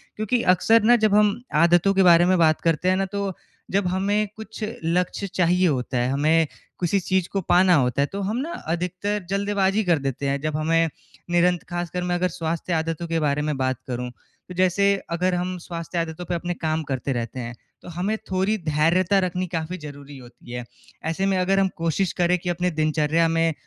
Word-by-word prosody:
क्योंकि 215 +3 0
अक्सर 225 +5 +3
ना 240 +3 +6
जब 205 -1 +3
हम 210 +2 +3
आदतों 175 +4 +4
के 195 0 +4
बारे 175 -1 +6
में 185 +1 +3
बात 160 -2 +3
करते 165 +2 +1
हैं 185 - +3
ना 195 - 0
तो, 200 0 -3 0.4
जब 195 -1 +1
हमें 200 +3 0
कुछ 220 0 -8 0.2
लक्ष्य 180 +4 -1
चाहिए 180 0 +2
होता 130 -3 -1
है, 120 +1 +1
हमें 155 +3 +3 0.3
किसी 185 +3 +1
चीज़ 185 -1 0
को 195 - -2
पाना 180 +1 +4
होता 130 -1 +1
है, 140 - +3
तो 200 +6 -6
हम 205 +4 -2
ना 295 +6 -3 0.2
अधिकतर 180 +3 -3
जल्दबाजी 200 +1 +1
कर 170 -5 +2
देते 135 0 -3
हैं, 140 0 0
जब 155 0 -2
हमें 165 +1 +2 0.4
निरंत 175 0 +2
ख़ासकर 175 0 -3
मैं 180 0 0
अगर 180 +1 +1
स्वास्थ्य 165 0 -3
आदतों 165 +1 -2
के 165 0 0
बारे 150 -1 0
में 150 -1 -1
बात 130 -1 -1
करूँ। 125 -1 -4
तो 180 - -17
जैसे 190 +2 +3 0.2
अगर 180 +2 0
हम 180 +1 -2
स्वास्थ्य 170 0 -6
आदतों 165 +1 -4
पे 175 - -2
अपने 175 +1 -3
काम 160 -1 -2
करते 135 -1 -3
रहते 120 +1 -4
हैं, 120 -1 -5 0.3
तो - - -11
हमें 200 +5 -1
थोड़ी 190 +4 +1
धैर्यता 170 +4 +2
रखनी 185 0 -1
काफ़ी 170 +1 -4
ज़रूरी 145 -3 -10
होती 120 -1 -14
है। 120 0 -4 0.4
ऐसे 165 +4 -1
में 195 -1 +1
अगर 190 +2 +2
हम 195 - +3
कोशिश 165 +3 0
करें 175 +1 +3
कि 180 - -4
अपने 175 +1 0
दिनचर्या 155 +1 +1
में 165 0 +1
175 Hz, 205 wpm, -23 LUFS, 155-190 Hz, 0.4 s, ना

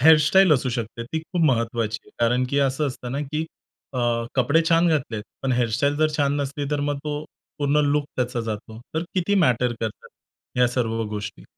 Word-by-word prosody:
Hair 160 +3 +8
style 190 -4 +6
असू 130 -2 +2
शकते 115 -1 -4
ती 160 +6 -3
खूप 170 +1 -2
महत्त्वाची 115 -3 0
आहे - - -19
कारण 125 +2 +3
की 140 - +1
असं 140 +2 +1
असतं 125 -1 -5
ना, 140 - -2
की 150 +2 -2 0.5
अ, 130 - -3 0.4
कपडे 140 +6 +3
छान 170 +1 +4
घातलेत, 125 -9 0 0.2
पण 135 -1 +1
हेअर 120 -1 +2
स्टाईल 140 +3 +1
जर 155 0 +3
छान 145 -1 +2
नसली, 140 +1 -3
तर 145 -1 0
मग 145 0 -1
तो 150 0 -3 0.3
पूर्ण 145 +1 +2
लूक 145 0 +2
त्याचा 125 -1 -1
जातो. 110 0 -5 0.2
तर 160 - 0
किती 190 +2 +1
मॅटर 125 -1 +2
करतात 110 -2 -5 0.5
ह्या 125 - +5
सर्व 115 -2 -1
गोष्टी? 105 -1 -5
135 Hz, 195 wpm, -24 LUFS, 120-150 Hz, 0.5 s, हेअर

